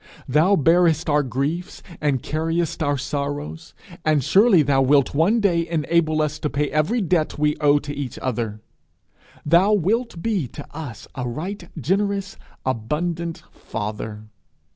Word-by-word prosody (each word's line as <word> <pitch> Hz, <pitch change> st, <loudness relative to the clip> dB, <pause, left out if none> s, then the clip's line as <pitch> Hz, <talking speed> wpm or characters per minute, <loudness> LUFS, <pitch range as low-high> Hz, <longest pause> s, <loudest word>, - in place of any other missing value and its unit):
Thou 155 Hz, +9 st, +4 dB
bearest 165 Hz, 0 st, +3 dB
our 145 Hz, 0 st, +4 dB
griefs 145 Hz, +7 st, -3 dB, 0.2 s
and 140 Hz, -4 st, 0 dB
carriest 165 Hz, +2 st, -1 dB
our 145 Hz, -2 st, +1 dB
sorrows; 145 Hz, +3 st, -4 dB, 0.3 s
and 155 Hz, -3 st, +2 dB
surely 195 Hz, -, +5 dB
thou 135 Hz, -1 st, +2 dB
wilt 140 Hz, 0 st, +3 dB
one 175 Hz, +11 st, +3 dB
day 170 Hz, -5 st, +1 dB
enable 155 Hz, -1 st, +1 dB
us 150 Hz, 0 st, -3 dB
to 150 Hz, -, -1 dB
pay 145 Hz, +1 st, -1 dB
every 155 Hz, +11 st, +1 dB
debt 170 Hz, -4 st, 0 dB
we 150 Hz, 0 st, +2 dB
owe 145 Hz, -1 st, +4 dB
to 145 Hz, 0 st, -5 dB
each 140 Hz, -4 st, -5 dB
other! 115 Hz, -4 st, -3 dB, 0.8 s
Thou 175 Hz, +7 st, +4 dB
wilt 210 Hz, +2 st, 0 dB
be 205 Hz, -, 0 dB
to 145 Hz, +4 st, -9 dB
us 145 Hz, -8 st, -7 dB
a 125 Hz, -2 st, -4 dB
right 175 Hz, -, -6 dB
generous, 195 Hz, -, -1 dB, 0.3 s
abundant 160 Hz, +8 st, -2 dB
father! 105 Hz, 0 st, -6 dB
155 Hz, 140 wpm, -22 LUFS, 140-175 Hz, 0.8 s, surely